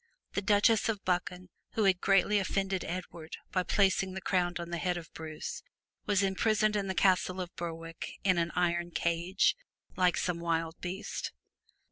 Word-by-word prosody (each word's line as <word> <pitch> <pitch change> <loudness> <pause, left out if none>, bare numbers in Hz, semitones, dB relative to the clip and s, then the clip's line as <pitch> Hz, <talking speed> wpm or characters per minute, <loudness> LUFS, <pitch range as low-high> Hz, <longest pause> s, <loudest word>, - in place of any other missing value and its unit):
The 200 - 0
Countess 210 +2 +4
of 210 -3 -2
Buchan 180 0 -1 0.2
who 220 - +1
had 190 -2 +3
greatly 195 +1 +4
offended 195 -1 -1
Edward 170 -2 -6
by 185 - +2
placing 190 0 +2
the - - -2
crown 180 -2 +1
on 170 0 -6
the 170 - -2
head 180 0 0
of 165 -2 -9
Bruce, 155 -1 -6 0.5
was 200 -1 +3
imprisoned 215 +2 +2
in 200 -1 0
the 190 - -2
castle 185 -1 +3
of 180 -1 -5
Berwick 165 -1 -6
in 185 -3 +3
an 170 -1 0
iron 175 0 +1
cage, 170 +3 +1 0.4
like 180 -1 +3
some 175 -2 -1
wild 165 -1 -1
beast. 185 +3 -4
185 Hz, 165 wpm, -31 LUFS, 170-195 Hz, 0.5 s, Countess